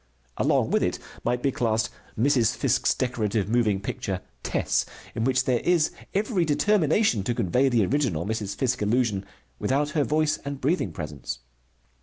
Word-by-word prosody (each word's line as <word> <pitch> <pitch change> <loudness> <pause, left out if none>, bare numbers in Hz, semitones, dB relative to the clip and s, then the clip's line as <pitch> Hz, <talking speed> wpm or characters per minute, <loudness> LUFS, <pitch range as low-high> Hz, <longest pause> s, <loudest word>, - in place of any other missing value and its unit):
Along - - +2
with - - +3
it - - 0 0.3
might 125 0 0
be 140 - +2
classed 115 -3 0 0.3
Mrs. 120 -1 +3
Fiske's - - +2
decorative 110 -5 -1
moving 110 -3 +2
picture 95 -1 -4 0.2
Tess, - - 0 0.3
in 115 - -1
which 130 0 +2
there 125 -2 +2
is 170 0 +2 0.2
every 200 -2 +1
determination 165 - +2
to 115 +5 -1
convey 125 +10 +2
the 115 -5 +3
original 110 - 0
Mrs. 105 -2 -3
Fiske 130 -1 0
illusion 105 -2 +1 0.4
without 145 +3 0
her 155 -2 +2
voice 155 +1 +1
and 140 -1 -5
breathing 155 +8 0
presence. 75 -9 -6
125 Hz, 155 wpm, -26 LUFS, 105-145 Hz, 0.4 s, with